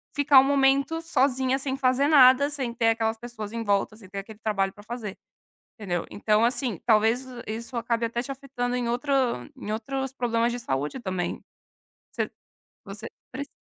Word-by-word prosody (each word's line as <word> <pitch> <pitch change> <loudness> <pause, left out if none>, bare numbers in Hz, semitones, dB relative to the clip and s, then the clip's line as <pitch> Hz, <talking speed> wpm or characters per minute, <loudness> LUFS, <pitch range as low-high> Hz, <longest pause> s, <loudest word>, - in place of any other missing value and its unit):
ficar 285 -2 +7
um - - +6
momento 275 +3 +2
sozinha, 265 -5 +1
sem 265 0 -2
fazer 260 +1 +2
nada, 280 -1 +7
sem 265 -5 -3
ter 230 -1 +2
aquelas 225 0 0
pessoas 225 -3 -7
em 230 0 -3
volta, 205 0 +1
sem 205 -4 -15
ter 200 - -8
aquele 210 +2 -10
trabalho 195 -3 0
para 205 - -14
fazer", 215 -3 -6 0.6
entendeu. 175 -5 -2
Então 215 +2 +2
assim, 240 -4 0
talvez 225 +3 +3 0.2
isso 230 +4 -6
acabe 235 0 0
até 235 +1 -2
te 275 - -6
afetando 260 -3 -3
em 245 -1 -1
outro 250 +5 -2 0.5
em 210 - -4
outros 265 +4 -3
problemas 235 -2 0
de - - -3
saúde 150 - -3
também. 185 -4 -3 0.7
Você - - -2 0.5
você 210 +2 -7 0.3
precis 280 +2 -6
240 Hz, 170 wpm, -26 LUFS, 215-265 Hz, 0.7 s, ficar